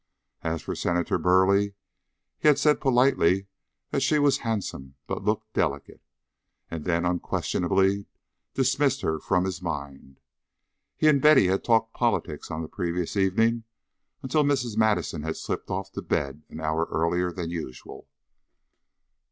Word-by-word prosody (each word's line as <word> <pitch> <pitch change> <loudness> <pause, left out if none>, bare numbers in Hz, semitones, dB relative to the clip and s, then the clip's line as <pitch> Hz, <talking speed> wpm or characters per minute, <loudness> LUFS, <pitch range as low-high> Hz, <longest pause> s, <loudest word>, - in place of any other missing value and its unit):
As 80 0 -3
for - - -4
Senator 85 0 0
Burleigh, 100 +3 +3 0.7
he - - +1
had 150 -2 +6
said 150 +1 +3
politely 120 - +3 0.5
that - - 0
she 155 - +3
was 145 -1 +3
handsome 100 - -4
but - - -4
looked - - -2
delicate, - - -2 0.7
and 80 -2 -5
then 85 -1 +1
unquestionably 95 +2 0 0.5
dismissed 135 +1 +2
her 80 0 -1
from 90 +4 +1
his 95 -2 -4
mind. 70 -5 -6 0.8
He 155 - +3
and 140 -3 +5
Betty 150 -7 +6
had 95 +1 0
talked 115 -1 +2
politics 115 -10 -1
on 80 +1 -4
the - - -6
previous 85 +2 -3
evening 110 +4 +2 0.6
until 140 +3 +2
Mrs. 130 -6 0
Madison 110 -7 +1
had 80 +1 -4
slipped - - -4
off 95 +1 -3
to - - -5
bed 70 +1 -2
an - - -9
hour 80 +1 0
earlier 90 +3 0
than 85 -1 -5
usual. 80 -7 -7
95 Hz, 145 wpm, -26 LUFS, 85-120 Hz, 0.8 s, had